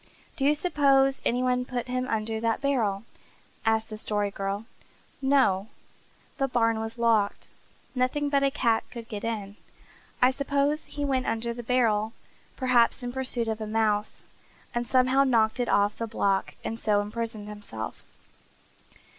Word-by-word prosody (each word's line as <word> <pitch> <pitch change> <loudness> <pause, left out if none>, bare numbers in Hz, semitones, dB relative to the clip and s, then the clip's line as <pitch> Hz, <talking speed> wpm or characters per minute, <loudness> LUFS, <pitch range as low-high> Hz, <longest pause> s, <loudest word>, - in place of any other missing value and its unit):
"Do 270 - -1
you 295 +2 +5
suppose 275 -4 +3
any 245 +2 +2
one 250 0 +2
put 250 -1 -3
him 255 0 -1
under 220 0 -1
that 230 0 0
barrel?" 230 -8 0 0.6
asked 220 0 +2
the 215 - -6
Story 205 -2 -1
Girl. 195 +2 -3 0.6
"No. 260 -8 +3 0.7
The 270 - +2
barn 230 -3 +2
was 225 +1 -5
locked. 225 -3 +2 0.5
Nothing 255 +3 0
but 280 -1 +2
a 275 - +3
cat 235 -5 +1
could 235 -2 -8
get 210 -3 -6
in. 210 -3 -4 0.6
I 250 +1 +5
suppose 280 +2 0
he 290 -1 -4
went 265 -2 0
under 235 +1 -1
the 240 - -6
barrel, 225 -3 +1 0.4
perhaps 250 -1 +3
in 245 - -3
pursuit 255 -3 -2
of 220 0 -2
a 215 - -3
mouse, 215 -1 0 0.5
and 240 -1 -2
somehow 255 +2 +4
knocked 230 -3 +2
it 245 - 0
off 205 +1 +2
the 230 - -2
block 200 -3 0
and 225 - -4
so 210 -3 +2
imprisoned 215 0 -4
himself." 205 - -7
230 Hz, 155 wpm, -27 LUFS, 215-260 Hz, 0.7 s, you